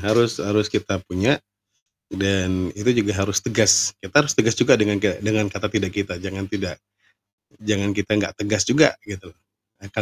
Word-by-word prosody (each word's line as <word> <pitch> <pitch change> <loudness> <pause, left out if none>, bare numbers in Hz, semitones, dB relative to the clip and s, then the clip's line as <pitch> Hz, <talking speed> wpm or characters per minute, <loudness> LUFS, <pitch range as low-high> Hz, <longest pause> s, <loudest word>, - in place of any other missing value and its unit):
harus 110 +3 +1
harus 105 +1 0
kita 100 - -1
punya, 95 +2 +1 0.7
dan 95 -2 -1
itu 115 +2 +1
juga 105 - -1
harus 100 0 0
tegas, 105 -2 +4
kita 95 -1 -13
harus 150 - 0
tegas 115 -2 +2
juga - - +4
dengan 105 -1 +2
ga 100 -1 -1
dengan 105 0 0
kata 105 - -3
tidak 100 -4 -1
kita 100 -3 -3
jangan 95 0 -6
tidak 95 -3 -5 0.9
jangan 105 -2 -1
kita 100 0 -4
nggak 100 - -1
tegas 105 -1 +1
juga 150 +5 +4
gitu, 95 -3 -10 0.5
akan 100 +2 -5
100 Hz, 170 wpm, -21 LUFS, 95-105 Hz, 0.9 s, tegas